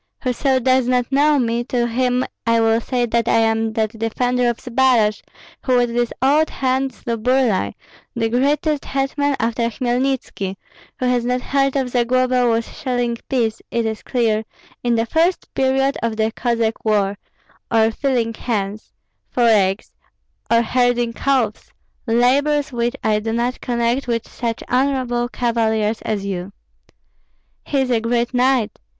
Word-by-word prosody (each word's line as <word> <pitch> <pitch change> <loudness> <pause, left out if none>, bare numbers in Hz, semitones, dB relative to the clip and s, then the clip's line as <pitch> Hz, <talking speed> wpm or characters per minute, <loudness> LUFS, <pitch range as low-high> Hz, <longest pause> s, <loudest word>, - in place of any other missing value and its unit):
Whoso 260 +1 +1
does 255 0 +2
not 250 0 +1
know 290 +2 +4
me, 235 -2 0
to 245 -1 0
him 250 +1 0 0.2
I 230 0 +4
will 225 0 +3
say 245 0 -1
that 235 0 0
I - - +3
am 225 0 +1
that 220 -1 0
defender 245 +2 0
of 235 - -2
Zbaraj 240 -4 +2 0.4
who 255 -2 +2
with 240 -1 +1
this 240 0 0
old 300 +4 +3
hand 265 0 0
slew 235 -1 -4
Burlai, 245 -3 +1 0.4
the 225 -1 0
greatest 285 +5 +1
hetman 275 +1 0
after 230 +1 0
Hmelnitski; 245 -5 -2 0.4
whoso 255 - 0
has 245 -1 +1
not 250 +1 0
heard 275 0 0
of 265 -3 -1
Zagloba 250 +1 +2
was 230 0 +1
shelling 245 -5 -1
peas, 230 -4 0
it 235 -1 -1
is 220 -1 -3
clear, 225 -3 0 0.4
in 240 -1 +1
the 225 0 +1
first 330 +7 0
period 270 +1 +1
of 230 -1 -2
the 220 0 +1
Cossack 230 -2 -1
war, 205 -2 +1 0.5
or 225 -1 +4
feeling 240 -2 -1
hens 210 -3 -4 0.4
(for 245 - 0
eggs), 200 -3 +2 0.6
or 230 0 +4
herding 245 0 +1
calves, 250 -5 -1 0.4
labors 275 +5 +2
which 240 +1 -1
I 215 -1 +2
do 225 +1 -3
not 240 +2 -1
connect 240 +2 -1
with 230 -2 -1
such 230 -2 -4
honorable 250 -2 0
cavaliers 225 -3 0
as 205 -2 -3
you." 190 0 -4 1.1
"He 280 -2 0
is 255 -1 -1
a 230 -2 +2
great 235 +2 0
knight!" 250 -3 +1
240 Hz, 155 wpm, -20 LUFS, 225-255 Hz, 1.1 s, know